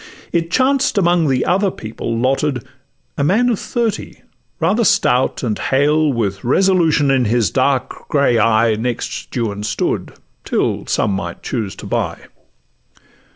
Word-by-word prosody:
It 165 -1 0
chanced 260 +4 +2
amongst 175 -4 +3
the 130 -1 +1
other 195 +2 +2
people 115 -4 -5
lotted, 130 +1 0 0.6
A - - +2
man 220 +11 +3
of 230 - 0
thirty 230 -3 -3 0.4
rather 190 +9 +2
stout 125 - +2
and 110 -4 -1
hale, 150 +3 +2
With 100 -6 -2
resolution 160 -1 +3
in 130 -2 +2
his 115 0 +1
dark 130 -1 -1
grey 140 -5 +2
eye, 110 +1 +3
Next 115 +2 -3
Juan 105 -4 -2
stood, 105 0 -2 0.3
till - - -1
some - - +1
might 85 -3 -5
choose 110 -7 -3
to - - -10
buy. - - -2
135 Hz, 140 wpm, -18 LUFS, 115-175 Hz, 0.6 s, amongst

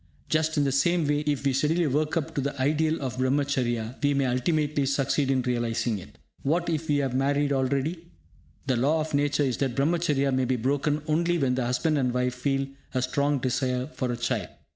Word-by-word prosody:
Just 155 0 +1
in 145 - +3
the 140 - +1
same 160 +4 +2
way, 145 0 +2
if 145 -2 0
we 135 - +2
steadily 155 +6 +2
work 150 +3 0
up 160 0 -2
to 145 - -1
the 140 0 -3
ideal 155 +4 +1
of 130 -1 -4
Brahmacharya, 130 -3 0
we 145 0 +2
may 140 -1 +2
ultimately 145 +3 0
succeed 140 0 +1
in 130 -2 +2
realising 120 -3 -1
it. - - -14 0.2
What 170 +4 0
if 160 -1 -2
we 145 - +3
have 135 -3 -1
married 140 +2 +1
already? 140 +6 -1 0.6
The 130 -3 +1
law 150 +6 +2
of 155 0 -5
Nature 145 0 +2
is 130 -3 0
that 135 -4 -1
Brahmacharya 145 -2 +1
may 130 0 +1
be 130 +1 +1
broken 145 +5 0
only 170 +3 +1
when 135 -5 +1
the 125 -1 -1
husband 145 +5 +1
and 125 -2 +1
wife 125 0 0
feel 135 +2 -1 0.3
a 130 - +2
strong 140 +2 +1
desire 125 0 -1
for 125 -2 -2
a 120 - -3
child. 120 -6 -1
140 Hz, 205 wpm, -26 LUFS, 130-150 Hz, 0.6 s, in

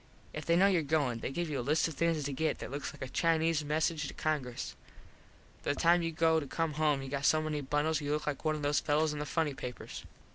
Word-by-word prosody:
If 155 - -6
they 170 - +4
know 185 +3 +5
your 190 -4 +4
goin 140 -6 0
they - - -3
give 170 +5 -2
you 145 -3 -2
a - - 0
list 150 +7 +2
of 165 - -5
things 165 0 +1
to 140 0 -3
get 155 +4 0
that - - -7
looks 140 +1 -4
like - - -8
a - - -4
Chinese 165 +1 +2
Message 155 +1 0
to - - -8
Congress. 140 -6 -2 0.9
By 145 - 0
the - - -7
time 170 +1 +5
you 165 0 -1
go 160 0 +3
to 145 - -6
come 165 +2 -1
home 150 -2 +1
you - - -6
got 140 +1 -3
so 155 - +4
many 155 -1 -2
bundles 150 +3 0
you 145 0 -2
look 150 0 -2
like 145 -2 -3
one 155 -1 +1
of 150 - -5
those 145 0 +2
fellos 150 +1 +1
in 150 - -4
the 150 - -3
Funny 155 -1 0
Papers. 125 -2 -7
150 Hz, 265 wpm, -32 LUFS, 145-160 Hz, 0.9 s, know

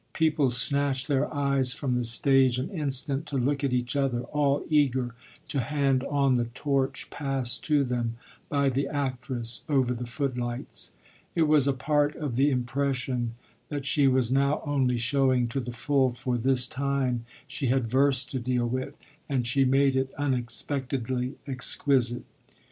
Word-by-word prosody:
People 155 -4 +2
snatched 135 +1 +1
their 145 -1 0
eyes 140 -3 +1
from 135 -4 -1
the 125 - 0
stage 130 +2 +3
an 135 +10 -3
instant 140 -3 -1
to 140 - -2
look 140 +3 0
at 140 - +1
each 125 0 -1
other, 135 -4 0
all 145 0 0
eager 130 -5 +1 0.4
to 140 - 0
hand 135 0 +1
on 140 -2 +2
the 120 -1 +1
torch 135 -1 -1
passed 135 -4 0
to 150 -3 +3
them 120 -3 -2 0.3
by 140 -1 +1
the 135 +1 0
actress 130 -5 -3
over 130 -4 +2
the 120 0 -5
footlights. 125 -1 -3 0.4
It 165 - +3
was 150 -3 +4
a - - +4
part 145 +2 +1
of 145 -6 -4
the 135 +4 +3
impression 125 -2 -1 0.3
that 145 -2 -4
she 140 0 +3
was 130 -2 +2
now 140 +2 +2
only 135 -4 +1
showing 130 0 +2
to 135 - -2
the 120 -1 -5
full, 130 +2 +1
for 125 0 -2
this 125 +1 +2
time 130 -2 -1 0.2
she 140 -1 -2
had 125 -1 +1
verse 135 +1 +3
to 130 - -4
deal 125 0 0
with 130 +4 -3 0.3
and 130 -4 0
she 135 +3 +3
made 135 +1 +3
it 130 0 -1
unexpectedly 130 -1 -2
exquisite. 130 -2 +1
135 Hz, 160 wpm, -27 LUFS, 125-140 Hz, 0.4 s, was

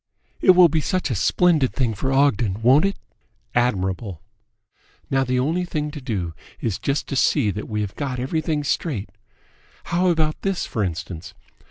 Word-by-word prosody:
"It 185 - +6
will 180 -1 +8
be 160 0 0
such 185 -3 -1
a - - 0
splendid 155 - +2
thing 125 -5 +1
for 130 +6 -2
Ogden, 120 -7 +2
won't 135 +8 +6
it?" 195 - -1 0.6
"Admirable." 95 -6 0 0.9
"Now 135 0 +3
the 125 -1 0
only 160 +8 0
thing 150 -4 -3
to 145 - -8
do 100 -10 -3 0.3
is 110 -6 -2
just 140 +1 -1
to 140 - -2
see 130 -4 +3
that 105 +2 -6
we 105 -1 -1
have 105 -1 -4
got 135 -3 -3
everything 155 +3 -1
straight. 135 - -2 0.7
How 175 +2 +1
about 160 -3 +1
this, 195 -2 -1
for 110 - -2
instance? 85 -2 -5
135 Hz, 170 wpm, -22 LUFS, 105-155 Hz, 0.9 s, will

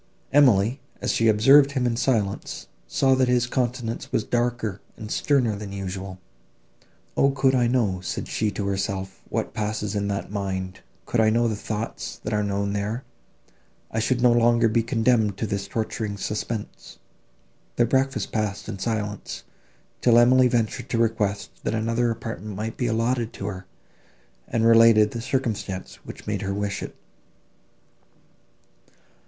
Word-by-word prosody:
Emily, 125 -3 +4 0.2
as - - 0
she 115 - +2
observed 135 +7 +6
him 130 -3 0
in 120 -1 +1
silence, 110 -5 -1 0.2
saw, 135 - +3
that 130 -1 +3
his 125 -1 +3
countenance 120 -1 -2
was 110 - +1
darker 120 -4 -1 0.2
and 110 0 -8
sterner 125 -7 +2
than 100 -1 -7
usual. 95 -1 -5 1.0
"O 140 - +4
could 135 -1 +2
I 125 -2 +3
know," 110 -7 +1
said - - -4
she 110 - 0
to 100 0 -4
herself, 95 -1 -3
"what - - -2
passes 105 -1 -2
in 100 -1 -1
that 100 -1 -3
mind; 95 -2 -3 0.3
could 120 - -1
I 110 -1 +5
know 120 +2 +2
the 110 - -1
thoughts, 105 +2 -5
that 110 - -3
are 105 - +2
known 100 0 -1
there, 105 +5 -2 0.9
I 110 - -1
should 120 +2 0
no 125 - +6
longer 120 0 +4
be 115 +1 +2
condemned 115 -3 +1
to 110 - -2
this 100 -1 -3
torturing 110 -1 -3
suspense!" 105 +2 -5 0.8
Their 120 - +3
breakfast 135 +3 0
passed 105 -2 -2
in 100 - -5
silence, 105 -1 -3 0.6
till 120 -1 +5
Emily 125 +2 +6
ventured 115 +1 -1
to 120 - 0
request, 105 -3 0
that - - -1
another 115 +2 +1
apartment 110 -3 -5
might 110 +3 -4
be 125 - -1
allotted 115 +1 0
to 95 - -7
her, 95 -2 -6 0.8
and 115 -1 0
related 115 -2 +6
the 115 - -5
circumstance 115 -7 -3
which - - -10
made 105 -1 -2
her 100 -1 -2
wish 100 -1 -2
it. - - -7
110 Hz, 155 wpm, -24 LUFS, 100-120 Hz, 1.0 s, observed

